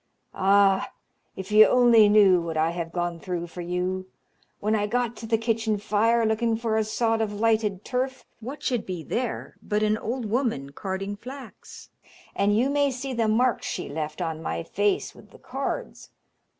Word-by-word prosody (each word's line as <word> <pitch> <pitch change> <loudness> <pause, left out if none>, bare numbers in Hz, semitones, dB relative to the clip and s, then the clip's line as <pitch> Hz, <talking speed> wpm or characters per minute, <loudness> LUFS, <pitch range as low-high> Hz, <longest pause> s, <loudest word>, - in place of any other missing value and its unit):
Ah, 195 0 +3 0.4
if 190 +2 -7
you 215 +1 +8
only 235 -4 +6
knew 200 -4 +6
what 165 -1 -4
I 160 +1 +2
have 170 -1 -5
gone 175 -1 -2
through 175 -1 -4
for 175 +1 -8
you! 180 +2 -2 0.5
When 215 +2 0
I 210 -1 0
got 240 +1 -1
to 225 - -7
the 225 0 +2
kitchen 225 -1 0
fire, 225 +3 +2
looking 220 +1 +1
for 225 -1 -1
a 220 - +2
sod 225 +1 0
of 215 -2 -1
lighted 215 -2 0
turf, 260 +1 -2
what 265 +6 -8
should 245 -4 0
be 180 -3 -5
there 240 +5 -4
but 210 0 -1
an 215 +1 +1
old 245 +1 -3
woman 215 - -1
carding 195 +5 -4
flax, 260 +5 -11 0.4
and 205 +1 +2
you 245 +4 +3
may 285 0 +2
see 265 +1 -5
the 230 -2 +1
marks 235 +3 +1
she - - -4
left 155 +3 -4
on 160 -1 -4
my 85 - -3
face 205 - 0
with - - -17
the - - -16
cards. - - -5
215 Hz, 180 wpm, -25 LUFS, 185-230 Hz, 0.5 s, you